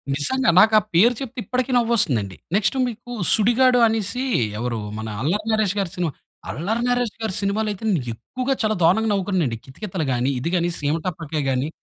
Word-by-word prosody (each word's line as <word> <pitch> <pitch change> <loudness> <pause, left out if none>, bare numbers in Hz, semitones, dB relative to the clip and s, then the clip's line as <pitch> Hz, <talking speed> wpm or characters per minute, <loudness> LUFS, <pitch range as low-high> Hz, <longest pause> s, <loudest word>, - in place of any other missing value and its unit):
నిజంగా 255 - +1
నాకు 220 +3 +5
ఆ - - -5
పేరు 225 +8 +6
చెప్తే 260 -1 -6
ఇప్పటికి 255 +6 -2
నవ్వు 235 -1 +1
వస్తుంది 140 - +3
అండి. 95 -2 -9 0.2
నెక్స్ట్ 210 +5 +1
మీకు 240 +1 -8 0.2
'సుడిగాడు' 245 +3 +4
అనేసి 225 +3 -1 0.4
ఎవరు, 120 -1 -2 0.2
మన 110 - -5
అల్లరి 200 +10 -1
నరేష్‌గారి 200 -4 0
సినిమా. 175 -3 -1 0.4
అల్లరి 220 +9 -2
నరేష్‌గారి 225 -4 -1
సినిమాలు 205 +2 0
అయితే 205 - -12
నేను 175 -7 +1
ఎక్కువగా 255 - -3
చాలా 215 0 +1
దారుణంగా 220 +7 +3
నవ్వుకున్నాను 190 -3 0
అండి. 115 -1 -4
'కితకితలు' 175 +3 -5
గాని, 125 +3 0
ఇది 165 - -2
గాని 175 -1 +1
'సీమటపాకాయ' 155 0 -2
గాని. 130 +3 -1
200 Hz, 175 wpm, -22 LUFS, 155-230 Hz, 0.4 s, పేరు